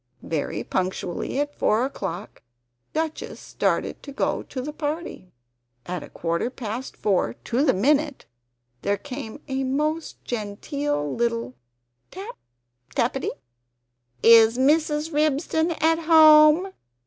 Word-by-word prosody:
Very 155 Hz, -3 st, -3 dB
punctually 185 Hz, +6 st, -2 dB
at 290 Hz, 0 st, -1 dB
four 225 Hz, -1 st, +2 dB
o'clock, 210 Hz, -7 st, -6 dB, 0.5 s
Duchess 315 Hz, 0 st, -3 dB
started -, -, -1 dB
to 280 Hz, -, -9 dB
go 275 Hz, -, -1 dB
to 265 Hz, -, -7 dB
the 295 Hz, +4 st, -4 dB
party. 300 Hz, -, -5 dB, 0.5 s
At 180 Hz, 0 st, -4 dB
a -, -, -10 dB
quarter 170 Hz, +7 st, -2 dB
past 250 Hz, 0 st, -6 dB
four 185 Hz, -, +1 dB
to 245 Hz, +4 st, 0 dB
the 310 Hz, -, +3 dB
minute, 290 Hz, +7 st, +1 dB, 0.6 s
there 200 Hz, 0 st, 0 dB
came 260 Hz, +1 st, -8 dB
a 270 Hz, -1 st, -1 dB
most 300 Hz, +5 st, -2 dB
genteel 215 Hz, -, -3 dB
little 230 Hz, -, -1 dB, 0.6 s
tap 410 Hz, +6 st, -8 dB, 0.6 s
tappity. -, -, 0 dB, 0.9 s
"Is 230 Hz, 0 st, +7 dB
Mrs. 300 Hz, +3 st, +2 dB
Ribston 310 Hz, +2 st, +1 dB
at 325 Hz, +1 st, +3 dB
home?" 315 Hz, +2 st, +6 dB
275 Hz, 115 wpm, -24 LUFS, 220-305 Hz, 0.9 s, Is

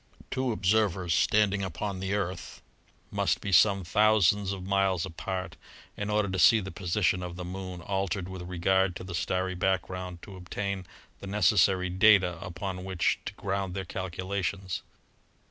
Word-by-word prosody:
Two 130 Hz, -1 st, 0 dB
observers 95 Hz, -4 st, +1 dB
standing 100 Hz, 0 st, +3 dB
upon 95 Hz, +1 st, -4 dB
the 95 Hz, +2 st, -1 dB
Earth 95 Hz, -3 st, -4 dB, 0.5 s
must -, -, +1 dB
be 100 Hz, -, -4 dB
some 100 Hz, 0 st, +5 dB
thousands 105 Hz, 0 st, +3 dB
of 95 Hz, -2 st, -5 dB
miles 95 Hz, -3 st, +1 dB
apart 90 Hz, +3 st, -5 dB, 0.4 s
in 105 Hz, 0 st, -4 dB
order 105 Hz, -1 st, +1 dB
to 95 Hz, -1 st, -2 dB
see 115 Hz, +5 st, +7 dB
the 95 Hz, -2 st, -6 dB
position 90 Hz, 0 st, 0 dB
of 90 Hz, -1 st, -6 dB
the 90 Hz, 0 st, -6 dB
Moon 90 Hz, -1 st, -6 dB
altered 95 Hz, -1 st, -2 dB
with 95 Hz, -1 st, -7 dB
regard 90 Hz, +1 st, +1 dB
to -, -, -7 dB
the 90 Hz, 0 st, -7 dB
starry 95 Hz, +1 st, -1 dB
background 90 Hz, -1 st, -2 dB
to 100 Hz, -, -10 dB
obtain 95 Hz, +1 st, -4 dB, 0.3 s
the 100 Hz, -, -8 dB
necessary 95 Hz, -2 st, +3 dB
data 95 Hz, -2 st, +5 dB
upon 90 Hz, +1 st, -5 dB
which 95 Hz, -2 st, 0 dB
to -, -, -5 dB
ground 95 Hz, -2 st, -3 dB
their 95 Hz, -1 st, -3 dB
calculations. 95 Hz, +1 st, -3 dB
95 Hz, 155 wpm, -28 LUFS, 90-100 Hz, 0.5 s, see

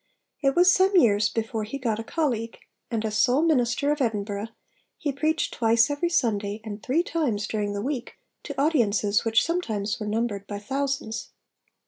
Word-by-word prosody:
It 275 Hz, -1 st, +2 dB
was 360 Hz, +1 st, +6 dB
some 380 Hz, +1 st, +3 dB
years 210 Hz, -, +4 dB
before 225 Hz, -1 st, -2 dB
he 220 Hz, +6 st, -5 dB
got 230 Hz, -5 st, -1 dB
a -, -, -3 dB
colleague; 235 Hz, -6 st, -2 dB, 0.3 s
and, 225 Hz, -2 st, -2 dB
as 215 Hz, -1 st, -1 dB
sole 265 Hz, +3 st, +4 dB
minister 280 Hz, -2 st, +2 dB
of 295 Hz, -1 st, -1 dB
Edinburgh, 210 Hz, -3 st, -1 dB, 0.5 s
he 290 Hz, -, -2 dB
preached 310 Hz, +3 st, 0 dB
twice 230 Hz, +3 st, +3 dB
every 290 Hz, +4 st, 0 dB
Sunday 210 Hz, -9 st, 0 dB
and 210 Hz, -1 st, -7 dB
three 295 Hz, +9 st, +1 dB
times 260 Hz, -13 st, -1 dB
during 205 Hz, -2 st, -2 dB
the 200 Hz, 0 st, -3 dB
week 260 Hz, -2 st, -4 dB, 0.3 s
to 285 Hz, -2 st, -5 dB
audiences 215 Hz, -, +2 dB
which 225 Hz, 0 st, +3 dB
sometimes 220 Hz, -, -2 dB
were 210 Hz, -, -4 dB
numbered 210 Hz, -2 st, -2 dB
by 205 Hz, -, -4 dB
thousands. 265 Hz, 0 st, -3 dB
230 Hz, 170 wpm, -25 LUFS, 210-285 Hz, 0.5 s, was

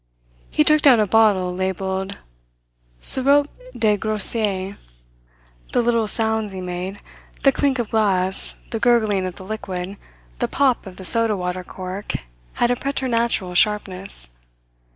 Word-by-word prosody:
He 300 Hz, -, +3 dB
took 305 Hz, 0 st, +4 dB
down 260 Hz, -6 st, +6 dB
a 215 Hz, -, +3 dB
bottle, 200 Hz, -4 st, +3 dB
labelled 190 Hz, +1 st, -3 dB, 0.8 s
"Sirop 280 Hz, +2 st, +4 dB, 0.3 s
de 210 Hz, -2 st, +2 dB
Groseille." 205 Hz, -2 st, +1 dB, 1.0 s
The -, -, +3 dB
little 230 Hz, -2 st, +1 dB
sounds 220 Hz, -2 st, 0 dB
he 190 Hz, -, -6 dB
made, 180 Hz, +2 st, -5 dB, 0.4 s
the 275 Hz, -, +6 dB
clink 275 Hz, 0 st, 0 dB
of 240 Hz, -3 st, -3 dB
glass, 190 Hz, -4 st, +1 dB, 0.2 s
the 225 Hz, -, -2 dB
gurgling 215 Hz, -5 st, +2 dB
of 180 Hz, -, -7 dB
the 190 Hz, -, -11 dB
liquid, 195 Hz, -2 st, -5 dB, 0.4 s
the -, -, 0 dB
pop 265 Hz, -6 st, +1 dB
of 185 Hz, -, -11 dB
the 190 Hz, -, -8 dB
soda 225 Hz, 0 st, +3 dB
water 180 Hz, 0 st, -3 dB
cork 185 Hz, +2 st, -6 dB, 0.4 s
had 240 Hz, 0 st, +1 dB
a -, -, +2 dB
preternatural 235 Hz, -8 st, -1 dB
sharpness. 195 Hz, -, +1 dB
210 Hz, 135 wpm, -21 LUFS, 185-230 Hz, 1.0 s, down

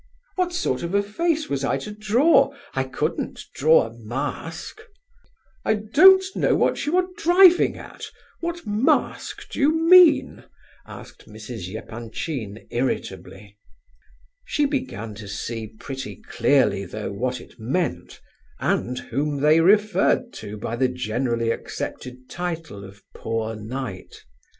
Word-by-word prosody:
'" -, -, -42 dB
"What 365 Hz, -1 st, 0 dB
sort 350 Hz, -, -1 dB
of 170 Hz, +3 st, -3 dB
a 200 Hz, -, +3 dB
face 315 Hz, +9 st, -1 dB
was 140 Hz, -1 st, -2 dB
I 135 Hz, -, +1 dB
to 135 Hz, +10 st, -7 dB
draw? 215 Hz, +12 st, +3 dB, 0.2 s
I 135 Hz, 0 st, -1 dB
couldn't 130 Hz, -, -3 dB
draw 155 Hz, +3 st, +4 dB
a 115 Hz, -, -9 dB
mask." 135 Hz, -, -6 dB, 0.8 s
"I 220 Hz, -, +2 dB
don't 310 Hz, -, +6 dB
know -, -, +2 dB
what -, -, 0 dB
you 335 Hz, +5 st, +2 dB
are 365 Hz, -, +3 dB
driving 355 Hz, +1 st, +5 dB
at; -, -, -9 dB, 0.3 s
what 340 Hz, 0 st, -4 dB
mask 230 Hz, +9 st, 0 dB
do -, -, -6 dB
you 290 Hz, +1 st, +4 dB, 0.2 s
mean?" 360 Hz, -3 st, +6 dB, 0.4 s
said -, -, -9 dB, 0.2 s
Mrs. 110 Hz, -3 st, -8 dB
Epanchin, 115 Hz, 0 st, -6 dB
irritably. 105 Hz, -4 st, -4 dB, 0.8 s
She 295 Hz, -, 0 dB
began 260 Hz, -, -3 dB
to 105 Hz, 0 st, -10 dB
see 110 Hz, +2 st, -5 dB
pretty 135 Hz, +5 st, -7 dB
clearly 130 Hz, -8 st, +1 dB
though 105 Hz, +3 st, -6 dB
what 125 Hz, +5 st, -2 dB
it -, -, -16 dB
meant, 120 Hz, -, -3 dB, 0.4 s
and 125 Hz, +1 st, -1 dB
whom 145 Hz, +4 st, -2 dB
they 155 Hz, +2 st, +5 dB
referred 205 Hz, +4 st, +3 dB
to 105 Hz, +1 st, -7 dB
by 110 Hz, +2 st, -4 dB
the 130 Hz, +1 st, +3 dB
generally 120 Hz, -1 st, -1 dB
accepted 125 Hz, +2 st, -6 dB
title 165 Hz, -, -5 dB
of 100 Hz, +1 st, -13 dB
"poor 115 Hz, 0 st, -3 dB
knight." 110 Hz, -2 st, -7 dB
135 Hz, 135 wpm, -23 LUFS, -, 0.8 s, don't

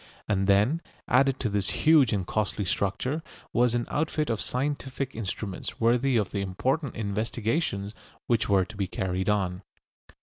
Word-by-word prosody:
And 95 Hz, -2 st, +1 dB
then, 105 Hz, +12 st, +3 dB, 0.3 s
added 135 Hz, +1 st, +3 dB
to 120 Hz, -, +1 dB
this 100 Hz, -2 st, 0 dB, 0.2 s
huge 155 Hz, -6 st, +6 dB
and 100 Hz, -3 st, 0 dB
costly 105 Hz, 0 st, -1 dB
structure, 100 Hz, -, -1 dB, 0.3 s
was 120 Hz, 0 st, +3 dB
an 120 Hz, -1 st, 0 dB
outfit 155 Hz, -2 st, 0 dB
of 110 Hz, -, -1 dB
scientific 135 Hz, 0 st, -2 dB
instruments 105 Hz, -2 st, -5 dB
worthy 120 Hz, +3 st, +3 dB
of 105 Hz, -4 st, 0 dB
the 100 Hz, -, -1 dB
important 130 Hz, -, -1 dB
investigations 110 Hz, -, -1 dB, 0.3 s
which 115 Hz, -3 st, +1 dB
were 95 Hz, -2 st, +4 dB
to 110 Hz, -, -12 dB
be 100 Hz, -2 st, -1 dB
carried 95 Hz, +1 st, -2 dB
on. 95 Hz, -3 st, 0 dB
110 Hz, 155 wpm, -27 LUFS, 100-130 Hz, 0.3 s, huge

